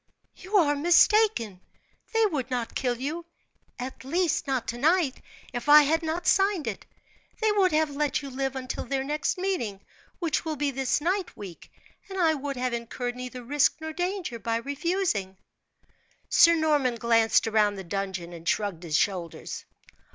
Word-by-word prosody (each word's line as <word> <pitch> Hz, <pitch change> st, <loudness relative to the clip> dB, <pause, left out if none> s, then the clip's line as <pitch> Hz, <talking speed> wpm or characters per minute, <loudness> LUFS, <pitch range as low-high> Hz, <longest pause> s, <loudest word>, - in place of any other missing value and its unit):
"You 390 Hz, +3 st, -1 dB
are 295 Hz, -6 st, +4 dB
mistaken! 340 Hz, -, +3 dB, 0.5 s
They 450 Hz, -1 st, +3 dB
would 285 Hz, -, -2 dB
not 245 Hz, -3 st, -3 dB
kill 245 Hz, -2 st, -1 dB
you; 320 Hz, +6 st, -4 dB, 0.5 s
at 255 Hz, +2 st, -7 dB
least, 325 Hz, +2 st, 0 dB
not 260 Hz, -3 st, -1 dB
tonight, 290 Hz, +4 st, +1 dB, 0.3 s
if 245 Hz, +4 st, -4 dB
I 300 Hz, 0 st, +10 dB
had 320 Hz, +3 st, +1 dB
not 330 Hz, +2 st, -3 dB
signed 390 Hz, -5 st, +2 dB
it. 225 Hz, -4 st, -5 dB, 0.5 s
They 440 Hz, -1 st, +2 dB
would 395 Hz, -3 st, +3 dB
have 310 Hz, -1 st, +2 dB
let 290 Hz, 0 st, -1 dB
you 275 Hz, -, -7 dB
live 270 Hz, +1 st, -2 dB
until 255 Hz, -1 st, -4 dB
their 265 Hz, +1 st, -2 dB
next 295 Hz, +4 st, -1 dB
meeting, 355 Hz, -, -2 dB, 0.4 s
which 330 Hz, -4 st, -1 dB
will 320 Hz, -2 st, -3 dB
be 290 Hz, 0 st, -1 dB
this 270 Hz, +2 st, 0 dB
night 360 Hz, +2 st, -1 dB
week; 190 Hz, -5 st, -10 dB, 0.4 s
and 385 Hz, -, -6 dB
I 325 Hz, -3 st, +4 dB
would 280 Hz, -2 st, -4 dB
have 250 Hz, -1 st, -1 dB
incurred 240 Hz, +1 st, -4 dB
neither 250 Hz, 0 st, -7 dB
risk 285 Hz, +4 st, +2 dB
nor 315 Hz, 0 st, -6 dB
danger 355 Hz, -, -3 dB
by 225 Hz, +2 st, -1 dB
refusing." 280 Hz, -, -1 dB, 0.9 s
Sir 335 Hz, 0 st, +6 dB
Norman 295 Hz, -6 st, +2 dB
glanced 230 Hz, -1 st, +3 dB
round 210 Hz, -2 st, +2 dB
the 190 Hz, -, -6 dB
dungeon 190 Hz, -2 st, -4 dB
and 165 Hz, 0 st, -4 dB
shrugged 200 Hz, -6 st, -1 dB
his 160 Hz, -3 st, 0 dB
shoulders. 180 Hz, -4 st, -2 dB
275 Hz, 165 wpm, -27 LUFS, 235-335 Hz, 0.9 s, I